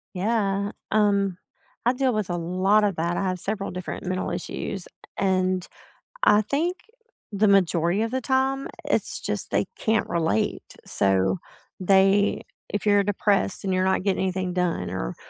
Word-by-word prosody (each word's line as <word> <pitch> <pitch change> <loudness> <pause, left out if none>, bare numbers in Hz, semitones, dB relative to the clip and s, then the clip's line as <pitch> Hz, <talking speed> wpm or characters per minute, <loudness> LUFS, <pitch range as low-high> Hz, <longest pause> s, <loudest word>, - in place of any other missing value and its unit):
Yeah, 200 0 0 0.2
um, 200 -3 +2 0.5
I 245 - +5
deal 260 -1 +1
with 215 -3 -2
a 175 - -1
lot 185 +5 +2
of 195 -4 0
that, 170 +2 -1
I - - 0
have 185 -1 -1
several 200 +2 -3
different 180 0 -6
mental 185 0 -2
issues, 175 +2 -5 0.3
and 185 -1 +1 0.6
I 210 +1 +6
think 325 - -1 0.5
the 210 +1 +2
majority 180 0 +3
of 230 - -3
the 260 0 -1
time, 265 +2 0 0.2
it's - - +1
just - - -1
they - - +1
can't 220 0 0
relate, 160 -11 0 0.2
so 95 -1 +1 0.4
they 195 +2 +3 0.3
if 205 - -3
you're 205 -1 +5
depressed 200 -1 0
and 190 -1 0
you're 185 - +2
not 190 0 +1
getting 195 -2 0
anything 185 -1 -1
done 180 -2 -1
or - - -4
195 Hz, 155 wpm, -25 LUFS, 180-210 Hz, 0.6 s, I